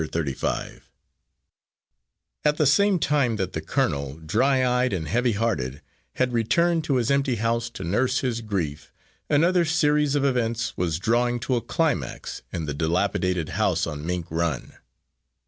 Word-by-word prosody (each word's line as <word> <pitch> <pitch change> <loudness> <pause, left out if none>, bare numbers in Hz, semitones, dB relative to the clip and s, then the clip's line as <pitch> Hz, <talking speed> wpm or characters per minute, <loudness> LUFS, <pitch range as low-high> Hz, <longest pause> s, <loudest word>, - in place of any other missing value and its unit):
Thirty 75 -5 -1
five - - -4 1.5
At 150 0 +2
the 155 - +3
same 195 +8 +4
time 145 -7 +1
that 95 -3 -3
the 80 - -3
colonel, 70 -3 -1
dry 130 - +2
eyed 125 -1 +1
and 80 -5 -2
heavy 120 - +1
hearted, 75 - -2 0.3
had 125 -1 0
returned 165 +9 +2
to 140 - +1
his 125 0 +1
empty 140 -2 +2
house 115 +1 -1
to 95 - -8
nurse 125 +9 +1
his 120 -3 -1
grief, 90 -9 -3 0.4
another 170 +4 +4
series 150 -3 +2
of 140 -1 +2
events 115 -3 0
was 85 -3 -1
drawing 120 +5 +1
to 130 0 0
a 120 - 0
climax 140 - -2
in 80 -2 -3
the 75 - -3
dilapidated 85 +2 0
house - - +1
on 75 0 -5
Mink 90 0 -2
Run. 80 -4 -2
115 Hz, 155 wpm, -25 LUFS, 85-135 Hz, 1.5 s, same